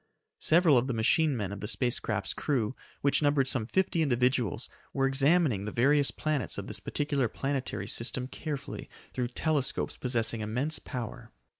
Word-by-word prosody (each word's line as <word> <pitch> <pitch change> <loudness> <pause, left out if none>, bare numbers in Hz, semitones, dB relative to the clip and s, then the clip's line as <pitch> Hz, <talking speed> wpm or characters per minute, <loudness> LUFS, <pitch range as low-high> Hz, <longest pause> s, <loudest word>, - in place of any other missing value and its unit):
Several 160 -5 +5
of 125 - -2
the 130 - -1
machine 130 +6 +3
men 100 -3 -3
of 100 - -6
the 105 - -4
space 120 +3 +1
craft's - - -2
crew, 130 -4 -1 0.3
which 140 +1 +3
numbered 145 -2 +3
some 120 -5 +1
fifty 180 +1 +1
individuals, 125 - +1 0.3
were 135 - +1
examining 135 - +2
the 105 - -4
various 140 +5 +4
planets 155 -3 -2
of - - -4
this - - -4
particular 145 -4 0
planetary 135 +3 -3
system 125 +2 -1
carefully 145 0 -6 0.2
through 125 -1 -1
telescopes 145 +2 -1
possessing 115 -2 0
immense 125 +9 -1
power. 120 -4 -7
130 Hz, 160 wpm, -29 LUFS, 115-145 Hz, 0.3 s, Several